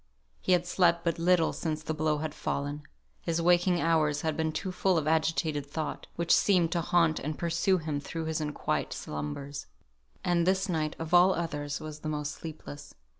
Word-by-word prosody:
He 185 Hz, -, +2 dB
had 175 Hz, -1 st, +3 dB
slept 175 Hz, -1 st, +2 dB
but 170 Hz, -1 st, 0 dB
little 170 Hz, -1 st, +3 dB
since 155 Hz, -2 st, -3 dB
the 160 Hz, -, -2 dB
blow 155 Hz, -1 st, +1 dB
had 155 Hz, 0 st, -4 dB
fallen; 145 Hz, 0 st, -3 dB, 0.4 s
his 165 Hz, -1 st, -1 dB
waking 175 Hz, +1 st, +3 dB
hours 155 Hz, -3 st, +2 dB
had 160 Hz, -2 st, -1 dB
been 160 Hz, -1 st, 0 dB
too 185 Hz, +4 st, -3 dB
full 185 Hz, 0 st, +2 dB
of 155 Hz, -2 st, 0 dB
agitated 160 Hz, -1 st, +1 dB
thought, 155 Hz, +2 st, -4 dB
which 170 Hz, 0 st, +2 dB
seemed 180 Hz, -5 st, +4 dB
to 170 Hz, -, +1 dB
haunt 165 Hz, -1 st, +2 dB
and 155 Hz, +2 st, -4 dB
pursue 170 Hz, +3 st, +1 dB
him 155 Hz, -4 st, -3 dB
through 160 Hz, +3 st, -5 dB
his 160 Hz, 0 st, -2 dB
unquiet 150 Hz, -1 st, -2 dB
slumbers. 75 Hz, -, -5 dB, 0.6 s
And 175 Hz, -1 st, +2 dB
this 190 Hz, +1 st, +2 dB
night 155 Hz, -4 st, -1 dB
of 165 Hz, +1 st, -6 dB
all 180 Hz, +2 st, +6 dB
others 145 Hz, -4 st, -3 dB
was 155 Hz, -1 st, -7 dB
the 155 Hz, -, -4 dB
most 150 Hz, -1 st, -2 dB
sleepless. 155 Hz, -2 st, -9 dB
160 Hz, 185 wpm, -29 LUFS, 150-170 Hz, 0.6 s, all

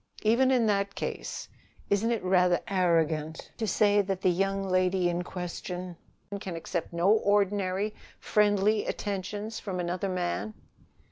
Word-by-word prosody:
"Even 235 Hz, +4 st, +4 dB
in 250 Hz, -3 st, +3 dB
that 200 Hz, -1 st, 0 dB
case, -, -, -4 dB, 0.4 s
isn't 205 Hz, +3 st, +2 dB
it 230 Hz, -4 st, -1 dB
rather 180 Hz, -1 st, +3 dB
arrogant 165 Hz, -4 st, 0 dB
to 225 Hz, -, -2 dB
say 205 Hz, 0 st, +3 dB
that 200 Hz, -2 st, +2 dB
that 190 Hz, -1 st, -2 dB
the 185 Hz, -, +3 dB
young 195 Hz, +2 st, 0 dB
lady 185 Hz, -1 st, +2 dB
in 175 Hz, 0 st, -1 dB
question 180 Hz, 0 st, -6 dB, 0.4 s
can 185 Hz, -3 st, -5 dB
accept 165 Hz, +1 st, -4 dB
no 170 Hz, +4 st, +3 dB
ordinary 205 Hz, -1 st, +1 dB, 0.3 s
friendly 210 Hz, 0 st, +2 dB
attentions 205 Hz, +2 st, -4 dB
from 190 Hz, -3 st, -4 dB
another 180 Hz, +2 st, -2 dB
man?" 105 Hz, -, -2 dB
190 Hz, 140 wpm, -28 LUFS, 180-205 Hz, 0.4 s, Even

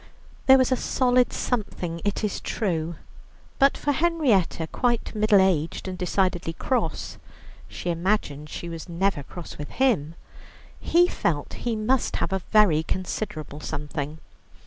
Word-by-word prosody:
There 265 Hz, 0 st, +9 dB
was 260 Hz, 0 st, +2 dB
a -, -, +5 dB
solid 250 Hz, 0 st, +2 dB
something 180 Hz, -8 st, -3 dB
it 205 Hz, +1 st, -1 dB
is 210 Hz, -, -1 dB
true, 170 Hz, -6 st, -2 dB, 0.6 s
but 275 Hz, 0 st, +5 dB
for 290 Hz, -, 0 dB
Henrietta, 280 Hz, -, +2 dB
quite 240 Hz, +8 st, -1 dB
middle 215 Hz, -1 st, +4 dB
aged 180 Hz, -3 st, +1 dB
and 185 Hz, -, -4 dB
decidedly 180 Hz, -2 st, 0 dB
cross 255 Hz, +9 st, -2 dB, 0.5 s
(she 175 Hz, -, -4 dB
imagined 165 Hz, -5 st, -1 dB
she 170 Hz, -, -6 dB
was 165 Hz, 0 st, -7 dB
never 175 Hz, -2 st, 0 dB
cross 165 Hz, +4 st, -9 dB
with 145 Hz, -, -6 dB
him), 185 Hz, -, +1 dB, 0.6 s
he 350 Hz, +1 st, +4 dB
felt 150 Hz, -, -1 dB, 0.2 s
he 230 Hz, -, 0 dB
must 235 Hz, +4 st, +1 dB
have -, -, -1 dB
a 190 Hz, -, 0 dB
very 205 Hz, -8 st, +5 dB
considerable 160 Hz, -4 st, -4 dB
something. 150 Hz, 0 st, -4 dB
190 Hz, 140 wpm, -25 LUFS, 165-240 Hz, 0.6 s, There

